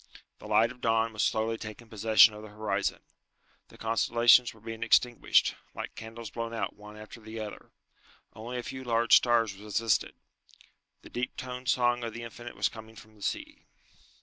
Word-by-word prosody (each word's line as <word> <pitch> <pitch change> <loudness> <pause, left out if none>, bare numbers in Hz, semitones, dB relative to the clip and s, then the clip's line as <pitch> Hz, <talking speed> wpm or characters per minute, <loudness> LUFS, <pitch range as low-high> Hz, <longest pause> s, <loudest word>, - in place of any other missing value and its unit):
The 105 - -10
light 110 +2 +3
of 125 - -15
dawn 115 0 +1
was 105 - -2
slowly 110 0 0
taking 110 +2 -9
possession 110 0 +5
of 105 - -9
the 110 - -10
horizon. 105 -2 -2 0.7
The - - -17
constellations 120 +2 +4
were 110 - -18
being 115 +1 -8
extinguished, 120 +1 +3 0.2
like - - -6
candles 115 -1 -9
blown 115 +1 -4
out - - -3
one 105 +1 -12
after 110 +2 -11
the 110 +1 -8
other. 105 -1 -8 0.6
Only 120 +3 -6
a 120 - -4
few 130 +2 -7
large 115 -1 +4
stars 115 -4 +3
resisted. 105 +2 -1 0.9
The - - -13
deep 125 +1 -4
toned 125 0 -5
song 120 -1 +2
of 115 -1 -5
the 120 - -6
Infinite 120 +1 -9
was - - +1
coming 110 0 -11
from 110 0 -15
the 105 - -21
sea. - - -5
115 Hz, 175 wpm, -29 LUFS, 110-120 Hz, 0.9 s, possession